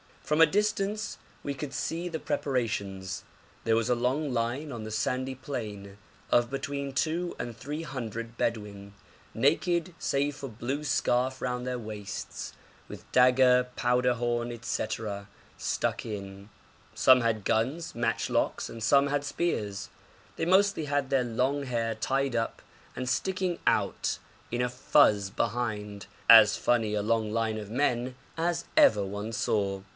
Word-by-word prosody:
From 150 +1 0
a - - +11
distance 210 +3 0 0.3
we 140 - -2
could 140 0 -6
see 165 +5 -2
the 165 -2 -3
preparations. 100 -11 -2 0.4
There 115 - +3
was 115 +2 +1
a 125 - +4
long 130 +4 0
line 125 +6 -1
on 115 -3 -6
the - - -5
sandy 130 +5 -1
plain 105 -7 -6 0.3
of 120 0 +4
between 140 0 -3
two 170 +5 -1
and 120 -1 -5
three 145 +7 -5
hundred 115 -5 -5
Bedouin, 100 -3 -3 0.4
naked 170 +7 +1
save 140 +1 0
for 140 - -6
a - - -5
blue 130 +7 -4
scarf 130 -2 +1
round 125 0 -2
their 125 0 -1
waists, 105 -3 -6 0.3
with - - -11
dagger, 125 0 +5
powder 125 0 +2
horn, 120 0 -1
&c., 110 - -1 0.7
stuck - - -1
in. 100 -1 -7 0.5
Some 130 -1 +7
had 115 -3 0
guns, 135 - 0
matchlocks, 115 0 0
and 115 - -8
some 140 +5 +4
had 145 0 -1
spears. 105 - -2 0.5
They - - 0
mostly 190 -2 +3
had 145 -2 0
their 135 -3 +2
long 130 +5 0
hair 115 -3 -1
tied 135 +3 0
up 115 - -2 0.3
and 125 - -4
sticking 185 +5 -1
out - - +1 0.3
in 120 +1 -1
a 125 - +1
fuz 105 -6 +3
behind, 105 -3 -2 0.2
as 110 -2 +9
funny 115 -3 +1
a 105 - +1
long 110 -1 +1
line 110 -1 0
of 105 -2 -6
men 125 0 0 0.2
as 170 +1 0
ever 105 -2 +6
one 100 +3 -5
saw. 100 -3 0
125 Hz, 150 wpm, -29 LUFS, 110-140 Hz, 0.7 s, a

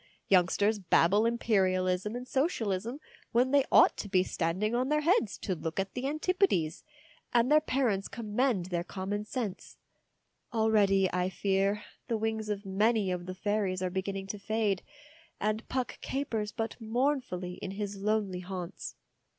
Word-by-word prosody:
Youngsters 200 +3 +3
babble 195 +4 +4
Imperialism 190 -3 +1
and 250 +1 -6
Socialism 240 - -1 0.3
when 250 +2 +3
they 280 -1 +5
ought - - +7
to 205 - -5
be 185 -2 +3
standing 185 +5 -1
on 250 +2 +1
their 300 0 +2
heads 310 - +2
to 190 - -2
look 165 0 -4
at 195 0 -2
the 255 +1 -2
Antipodes, 310 - +1 0.5
and 240 +3 +4
their 305 0 +7
parents 245 -9 0
commend 225 -3 0
their 170 -1 0
common 200 +3 -4
sense. 215 -4 -5 0.7
Already, 210 -4 +3
I 180 0 +1
fear, 195 +2 0 0.2
the 230 - 0
wings 220 0 -2
of 205 0 -3
many 205 +1 +2
of 180 0 -4
the 185 - -5
fairies 195 -2 -1
are 180 - -1
beginning 195 +1 -3
to 210 - -4
fade, 205 -2 0 0.6
and 215 +2 -1
Puck 255 -1 -3
capers 225 -7 -2
but 225 +2 -4
mournfully 225 -6 -1
in - - -4
his 200 +1 -4
lonely 200 -2 0
haunts. 180 0 -6
210 Hz, 150 wpm, -30 LUFS, 190-235 Hz, 0.7 s, ought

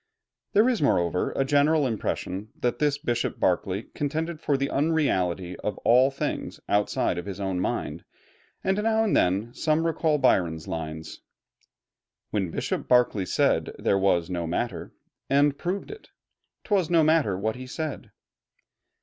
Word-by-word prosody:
There 215 +4 +5
is 250 -3 +1
moreover 90 - +1
a 135 - +1
general 145 +2 +3
impression 105 -3 -3
that 120 - -1
this 145 -2 +2
Bishop 120 -4 -2
Berkeley 95 +3 0
contended 160 +3 -2
for 140 - +1
the 140 +1 0
unreality 95 - 0
of 105 - -4
all 125 +3 +6
things 140 - -4
outside 100 -3 +1
of 90 - -7
his 95 -1 -6
own 95 -2 -2
mind, 90 - -3 0.6
and 190 +2 +1
now 220 0 +2
and 215 - +1
then 100 +6 +1
some 155 +1 +1
recall 160 -2 +1
Byron's 80 - +1
lines 80 -1 -6 1.1
"When 95 -4 -1
Bishop - - -3
Berkeley 120 -6 +3
said - - +1
'there 100 - +1
was 90 -4 +2
no 85 -2 -3
matter,' 85 - -3 0.4
And 140 +1 +3
proved 180 - -4
it, 430 - -12 0.5
'twas 195 -7 +1
no 165 -2 +4
matter 155 - +3
what 110 +3 -1
he 130 0 -8
said." 155 +2 -5
125 Hz, 150 wpm, -26 LUFS, 95-155 Hz, 1.1 s, all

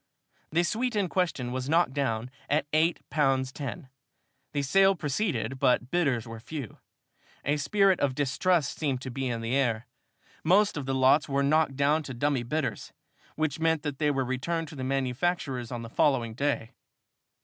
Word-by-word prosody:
The 170 +3 +3
suite 235 +6 -1
in 200 -4 +1
question 165 -10 -1
was 130 +1 -3
knocked 165 -4 +3
down 125 -4 -1 0.2
at 150 0 +2
eight 160 +2 +2
pounds 135 -3 +2
ten. 140 +2 -6 0.6
The 145 -1 -1
sale 195 +7 +4
proceeded, 150 -3 -2
but 125 -2 +2
bidders 140 -10 +1
were 115 0 -7
few. 135 -1 -7 0.7
A 145 +2 +2
spirit 190 +6 +3
of 135 -2 +1
distrust 145 +3 +1
seemed 140 -5 0
to 130 - -6
be 135 +2 -2
in 115 -2 -2
the 115 +3 -1
air. 120 -4 +1 0.6
Most 200 +5 +4
of 145 -3 -4
the 135 - 0
lots 130 +3 +4
were 140 0 +1
knocked 150 -1 +2
down 145 +3 +2
to 135 -4 -7
dummy 140 +1 +1
bidders, 145 +5 -3 0.4
which 155 -1 -1
meant 160 -1 +1
that 145 -3 -4
they 150 -1 +2
were 135 -2 0
returned 160 +6 -2
to 150 - -10
the 130 - -5
manufacturers 130 -1 -1
on 120 -1 -4
the - - -6
following 120 -3 +1
day. 140 -3 -1
140 Hz, 175 wpm, -28 LUFS, 130-160 Hz, 0.7 s, sale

